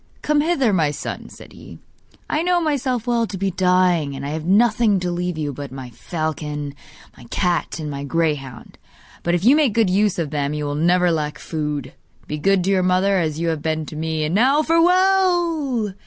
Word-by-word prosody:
'Come 300 -1 +2
hither, 285 -9 +1
my 160 -5 +2
son,' 145 - -6
said - - -14
he; - - -12 0.5
'I 305 - 0
know 355 +1 +2
myself 265 -7 -1
well 235 -2 +1
to 200 - -6
be 195 +1 -1
dying, 180 -5 +2
and 135 +1 -6
I - - -3
have 155 +1 -4
nothing 210 +1 +3
to 180 -1 -2
leave 175 -1 -3
you 150 -2 -3
but 140 0 -7
my 130 -2 -8
falcon, 150 0 -4 0.4
my 120 - -15
cat 175 +5 -1
and 155 -2 -5
my 140 0 -5
greyhound; 140 -5 -3 0.4
but 175 0 0
if 175 +3 -2
you 260 +4 +7
make 295 -8 +2
good 220 -5 +3
use 205 0 +2
of 165 -4 -2
them 145 0 -1
you 150 0 -3
will 145 - -2
never 175 +3 +2
lack 150 -2 -2
food. 150 -4 -4 0.3
Be 150 - -5
good 195 +2 +2
to 195 - +1
your 190 -1 +3
mother, 185 +2 +2
as 155 -2 -2
you 170 0 0
have 160 -2 -2
been 155 0 -2
to 155 - -9
me. 160 0 -2
And 155 +2 -1
now 265 +9 +3
farewell! 335 - +2
180 Hz, 205 wpm, -21 LUFS, 150-230 Hz, 0.5 s, you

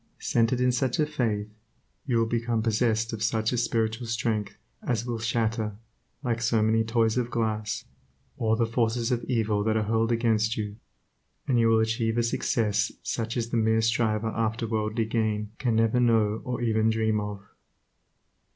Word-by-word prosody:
Centered 115 +2 +1
in 125 0 +3
such 130 +5 0
a 155 - +3
faith, 115 -9 -1 0.6
you 120 -3 +2
will 115 - +3
become 115 0 -1
possessed 115 0 +1
of 110 - -5
such 110 +1 +1
a - - 0
spiritual 115 0 -1
strength 110 -3 -2 0.2
as 120 -2 -1
will 120 -2 -3
shatter, 110 -1 -1 0.5
like 115 -2 -1
so 115 -1 +2
many 110 +1 +3
toys 115 +1 +1
of 120 -1 -2
glass, 110 -3 -2 0.5
all 110 -1 +1
the 115 0 +1
forces 115 +1 0
of 120 -1 0
evil 110 -4 0
that 110 +1 +1
are 110 - +1
hurled 115 +2 +1
against 115 -1 +1
you, 105 -1 -4 0.7
and 125 -3 +2
you 115 - +4
will 115 0 +4
achieve 115 +1 0
a 120 - +3
success 110 -3 0
such 115 +1 -3
as 115 -1 -2
the 120 - 0
mere 110 0 +3
striver 110 -1 +1
after 115 +1 -1
worldly 110 0 -1
gain 110 -2 -1
can 120 -4 +1
never 115 +2 +3
know 110 -3 +2
or 125 -1 -3
even 110 -1 +2
dream 110 -1 +1
of. 105 -1 -5
115 Hz, 175 wpm, -27 LUFS, 110-115 Hz, 0.7 s, you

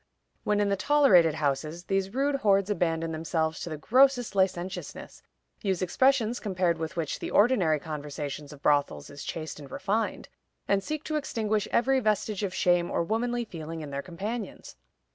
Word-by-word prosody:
When 210 0 +1
in 205 -1 +2
the 200 - +2
tolerated 195 - +4
houses, 155 +3 -2
these 195 +1 -1
rude 275 +4 +1
hordes 200 -4 +2
abandon 165 -4 0
themselves 160 0 -1
to - - -5
the 155 - -5
grossest 250 - +3
licentiousness, 190 -1 -2 0.4
use 190 -3 0
expressions 245 +4 +2
compared 180 -5 0
with 160 +3 -4
which 160 -3 -2
the - - -4
ordinary 200 - +3
conversation 145 -1 -6
of 150 -1 -13
brothels 145 - +1
is 140 -1 -9
chaste 160 -2 -5
and 140 -2 -10
refined, 200 - -2 0.4
and 195 -1 +2
seek 310 +4 -4
to 310 -1 -2
extinguish 215 -7 -1
every 265 +2 +3
vestige 215 -2 0
of 200 -3 -1
shame 175 -1 +2
or - - 0
womanly 240 +5 -1
feeling 165 -4 -7
in 150 -2 -7
their 140 0 -3
companions. 205 +8 -6
190 Hz, 165 wpm, -28 LUFS, 160-220 Hz, 0.4 s, tolerated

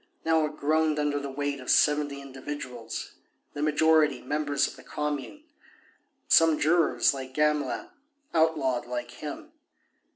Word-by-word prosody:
Now 160 -1 +3
it 150 0 -10
groaned 155 +1 +1
under 145 -1 0
the 140 0 -5
weight 145 +1 -3
of 130 - -9
seventy 145 -2 +3
individuals, 130 -3 -7 0.4
the 145 - -5
majority 155 -2 +3
members 145 +2 0
of - - -9
the - - -14
Commune, 150 - -4 0.8
some 165 -2 +5
jurors, 165 0 +3
like 130 -1 -8
Gamelin, 150 - 0 0.5
outlawed 150 -7 +1
like 120 -1 -4
him. 305 - -8
150 Hz, 130 wpm, -27 LUFS, 135-155 Hz, 0.8 s, some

